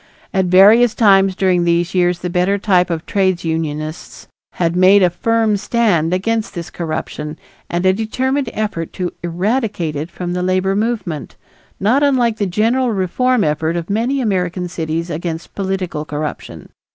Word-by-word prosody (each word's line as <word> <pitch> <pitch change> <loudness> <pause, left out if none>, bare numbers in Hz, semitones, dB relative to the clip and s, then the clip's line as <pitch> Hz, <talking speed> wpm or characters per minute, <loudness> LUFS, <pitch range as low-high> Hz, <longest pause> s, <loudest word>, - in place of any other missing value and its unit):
At 190 -1 +2
various 210 +6 +6
times 195 -3 +4
during 185 -2 +2
these 170 +1 +1
years 180 -1 +2
the 180 - -3
better 180 +3 +1
type 185 -3 +2
of 165 -1 -3
trades 185 -3 0
unionists 155 0 -4 0.3
had 170 -1 -1
made 190 +2 +6
a 180 - +3
firm 225 +2 +1
stand 200 -6 +1
against 215 +4 -1
this 170 -1 -6
corruption 155 -2 -5 0.3
and 175 +2 -1
a 185 - +5
determined 255 +5 -1
effort 205 -7 -3
to 180 -2 -3
eradicate 175 - -1
it 150 +4 -4
from 175 0 -5
the 180 - -2
labor 185 +1 +1
movement, 205 - -3 0.4
not 235 +8 +2
unlike 250 -6 +2
the 205 - 0
general 230 +7 +1
reform 225 +5 +1
effort 160 +2 0
of 170 +2 -4
many 245 +6 0
American 180 -5 -1
cities 165 0 -3
against 165 +1 -5
political 190 -5 -3
corruption. 150 0 -6
185 Hz, 155 wpm, -17 LUFS, 170-215 Hz, 0.4 s, various